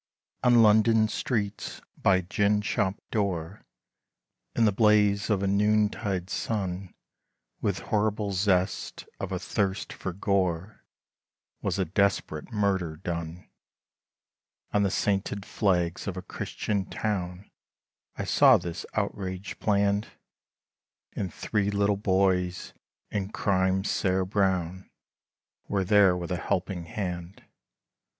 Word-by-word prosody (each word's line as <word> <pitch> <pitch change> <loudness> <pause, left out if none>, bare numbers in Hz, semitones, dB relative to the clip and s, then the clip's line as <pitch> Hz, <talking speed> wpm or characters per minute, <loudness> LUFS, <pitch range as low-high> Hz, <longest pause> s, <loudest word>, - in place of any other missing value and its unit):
ON 120 -2 +6
London 110 +1 +5
streets 105 -2 -3 0.2
by 100 - +3
a 95 - +1
gin 105 +3 +1
shop 100 -1 0
door, 95 -3 -2 0.9
In 115 - +4
the 105 - +4
blaze 105 0 +3
of 100 -2 +1
a - - +1
noontide 105 -2 +1
sun, 95 -4 -3 0.7
With - - 0
horrible 105 -1 +1
zest 95 -1 0
of - - -4
a - - -1
thirst 95 -1 -2
for 95 - -5
gore, 95 0 -1 0.8
Was 100 -1 -1
a 95 - +1
desperate 95 -1 0
murder 95 -7 0
done, 85 0 -5 1.3
On 105 - +3
the 100 - +2
sainted 100 0 -1
flags 90 -4 0
of 95 -1 -3
a 95 - -5
Christian 100 +1 -3
town, 95 -3 -3 0.6
I - - -3
saw - - +6
this 85 -1 -6
outrage 95 -2 -3
planned, 100 0 +1 1.1
And 95 -4 -3
three 100 +2 -1
little 100 0 +2
boys, 95 -2 +1 0.4
in 100 -2 -2
crime, 95 -2 +1
sere 95 -2 +1
brown 95 -2 0 0.8
Were 100 -1 0
there 100 -2 +5
with 85 0 -5
a 90 - 0
helping 90 0 -2
hand. 90 -1 -5
100 Hz, 115 wpm, -27 LUFS, 90-105 Hz, 1.3 s, ON